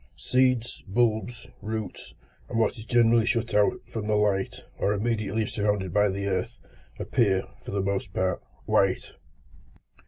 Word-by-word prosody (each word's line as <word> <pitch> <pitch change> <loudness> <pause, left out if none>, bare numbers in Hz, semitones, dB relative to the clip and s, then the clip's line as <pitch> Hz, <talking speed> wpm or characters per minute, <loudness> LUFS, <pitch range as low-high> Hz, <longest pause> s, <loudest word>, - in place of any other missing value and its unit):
Seeds, 125 -1 +1
bulbs, 110 +1 0 0.2
roots, 110 -3 -5 0.3
and - - -2
what 115 +2 +2
is 110 -2 -10
generally 115 -1 +4
shut 115 -1 0
out 105 0 +4
from 110 -2 -5
the 105 - +2
light, 100 -2 +1 0.2
or 100 - +2
immediately 110 0 0
surrounded 105 -4 -1
by 105 0 +4
the 100 +1 -3
earth, 100 +4 -2 0.4
appear, 100 -7 +1 0.2
for - - -8
the 100 0 -1
most 100 -1 -2
part, 95 -1 0 0.2
white. - - +2
105 Hz, 145 wpm, -27 LUFS, 100-115 Hz, 0.4 s, generally